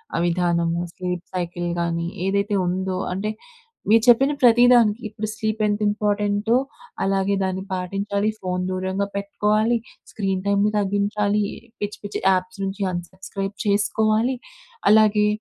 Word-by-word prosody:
ఆ -, -, 0 dB
విధానము. 170 Hz, -1 st, +1 dB
Sleep 180 Hz, -1 st, -4 dB
cycle 175 Hz, -1 st, -3 dB
గానీ 170 Hz, 0 st, -1 dB, 0.2 s
ఏదైతే 200 Hz, +2 st, 0 dB
ఉందో 185 Hz, +1 st, -1 dB, 0.2 s
అంటే 195 Hz, +3 st, -2 dB, 0.6 s
మీరు 225 Hz, 0 st, +5 dB
చెప్పిన 270 Hz, +4 st, +6 dB
ప్రతి 240 Hz, -1 st, +6 dB
దానికి 230 Hz, -1 st, +4 dB
ఇప్పుడు 215 Hz, +1 st, -5 dB
స్లీప్ 220 Hz, 0 st, -2 dB
ఎంత 205 Hz, 0 st, 0 dB
ఇంపార్టెంటో 205 Hz, +1 st, +1 dB, 0.5 s
అలాగే 195 Hz, +1 st, +1 dB
దాన్ని 190 Hz, 0 st, -2 dB
పాటించాలి. 200 Hz, +3 st, -1 dB
ఫోన్ 180 Hz, 0 st, -2 dB
దూరంగా 190 Hz, +2 st, -2 dB
పెట్టుకోవాలి. 210 Hz, +3 st, +1 dB, 0.3 s
స్క్రీన్ 195 Hz, -3 st, -1 dB
టైమ్‌ని 200 Hz, +1 st, +2 dB
తగ్గించాలి. 205 Hz, +1 st, +1 dB, 0.4 s
పిచ్చి, 205 Hz, 0 st, -3 dB
పిచ్చి 205 Hz, -, -4 dB
యాప్స్ 185 Hz, +1 st, -1 dB
నుంచి 195 Hz, +1 st, -4 dB
అన్ 175 Hz, -1 st, -2 dB
సబ్స్క్రైబ్ 195 Hz, +1 st, -6 dB
చేసుకోవాలి. 215 Hz, +4 st, +2 dB, 0.6 s
అలాగే 210 Hz, -1 st, +5 dB
200 Hz, 130 wpm, -22 LUFS, 185-210 Hz, 0.6 s, చెప్పిన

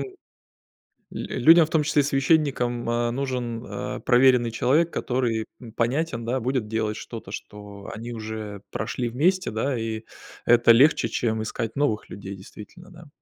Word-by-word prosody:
л 385 Hz, -, -6 dB, 1.0 s
людям, 165 Hz, +1 st, +4 dB
в -, -, -15 dB
том 160 Hz, -2 st, +2 dB
числе 145 Hz, -1 st, +3 dB
священникам, 135 Hz, -4 st, +1 dB
а, 120 Hz, 0 st, 0 dB
нужен, 125 Hz, -3 st, -3 dB
а, -, -, -5 dB
проверенный 125 Hz, -1 st, +4 dB
человек, 150 Hz, +8 st, +2 dB
который, 120 Hz, -3 st, -1 dB
м, 120 Hz, -3 st, -11 dB
понятен, 120 Hz, +1 st, -1 dB
да, 125 Hz, +3 st, 0 dB
будет 125 Hz, -2 st, -1 dB
делать 110 Hz, -1 st, -1 dB
что-то, 115 Hz, -5 st, -8 dB
что 105 Hz, -1 st, -9 dB
они 120 Hz, +2 st, -7 dB
уже 110 Hz, -2 st, -6 dB
прошли 120 Hz, -2 st, -3 dB
вместе, 180 Hz, +10 st, +1 dB
да. 120 Hz, +4 st, -1 dB
И 110 Hz, -1 st, -3 dB, 0.4 s
это 120 Hz, 0 st, +6 dB
легче, 130 Hz, 0 st, +4 dB
чем 110 Hz, -1 st, -1 dB
искать 110 Hz, +1 st, -4 dB
новых 125 Hz, -7 st, 0 dB
людей, 100 Hz, -1 st, -7 dB
действительно, 105 Hz, -, -13 dB
да. 170 Hz, -3 st, -14 dB
120 Hz, 150 wpm, -24 LUFS, 110-140 Hz, 1.0 s, это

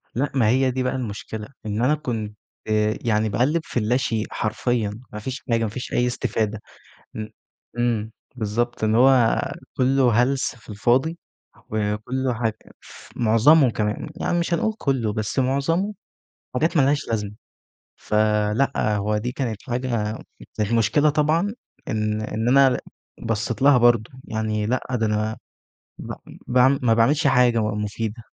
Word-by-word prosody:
لأ 140 Hz, +4 st, 0 dB
ما 115 Hz, -5 st, +3 dB
هي 130 Hz, +2 st, +3 dB
دي 130 Hz, 0 st, -2 dB
بقى 130 Hz, +1 st, -1 dB
المشكلة 110 Hz, -2 st, -5 dB, 0.2 s
إن 105 Hz, +2 st, -2 dB
أنا 150 Hz, +4 st, +3 dB
كنت 110 Hz, -7 st, -4 dB, 0.7 s
يعني 110 Hz, -2 st, +1 dB
باقلِّب 130 Hz, +10 st, +1 dB
في 120 Hz, -, -2 dB
اللاشئ 115 Hz, -1 st, 0 dB
حرفيًا 110 Hz, -1 st, -1 dB
ما 105 Hz, -, -5 dB
فيش 130 Hz, +4 st, -6 dB
حاجة، 115 Hz, 0 st, +2 dB
ما 110 Hz, -, -1 dB
فيش 125 Hz, +5 st, -6 dB
أي 125 Hz, 0 st, +2 dB
استفادة 110 Hz, -3 st, -2 dB, 0.5 s
إمم 110 Hz, 0 st, -5 dB, 0.5 s
إمم 115 Hz, -2 st, 0 dB, 0.2 s
بالضبط 120 Hz, +1 st, -2 dB
إن 110 Hz, 0 st, +2 dB
هو 125 Hz, -2 st, +5 dB, 0.4 s
كله 130 Hz, -1 st, +3 dB
هلس 135 Hz, 0 st, -1 dB
في 115 Hz, -, -19 dB
الفاضي، 125 Hz, +10 st, +1 dB, 0.5 s
وكله 110 Hz, +5 st, -1 dB
حاج 110 Hz, -1 st, -1 dB, 0.3 s
ف -, -, -14 dB
معظمه 120 Hz, +5 st, +5 dB
كمان، 105 Hz, +7 st, -2 dB
يعني 175 Hz, -, +1 dB
مش 170 Hz, 0 st, -1 dB
هنقول 220 Hz, +6 st, +1 dB
كله 125 Hz, -7 st, 0 dB
بس 110 Hz, +4 st, -2 dB
معظمه 165 Hz, +10 st, 0 dB, 0.6 s
حاجات 160 Hz, +5 st, +1 dB
ما 140 Hz, -, +5 dB
لهاش 145 Hz, +2 st, +1 dB
لازمة، 105 Hz, -3 st, -2 dB, 0.6 s
فلأ 105 Hz, +2 st, +1 dB
هو 105 Hz, +1 st, 0 dB
دي 120 Hz, +4 st, -3 dB
كانت 115 Hz, -6 st, -4 dB
حاجة 120 Hz, -3 st, -1 dB, 0.4 s
المشكلة 115 Hz, +7 st, +2 dB
طبعًا 155 Hz, +8 st, +1 dB, 0.3 s
إن 110 Hz, 0 st, -1 dB
إن 110 Hz, +2 st, -3 dB
أنا 135 Hz, -2 st, +5 dB, 0.4 s
بصيت 115 Hz, +2 st, -2 dB
لها 140 Hz, -2 st, +6 dB
برضه، 120 Hz, -2 st, +3 dB
يعني 110 Hz, -1 st, -2 dB
لأ 125 Hz, +3 st, -1 dB
ده 115 Hz, -3 st, 0 dB
أنا 110 Hz, +1 st, -1 dB, 0.6 s
ب -, -, -6 dB, 0.3 s
باعم 130 Hz, +2 st, +4 dB
ما 115 Hz, -2 st, +4 dB
باعملش 140 Hz, +7 st, +3 dB
حاجة 125 Hz, -3 st, +4 dB
بقى 105 Hz, -1 st, -1 dB
مفيدة، 110 Hz, +2 st, -4 dB
115 Hz, 145 wpm, -23 LUFS, 110-130 Hz, 0.7 s, لها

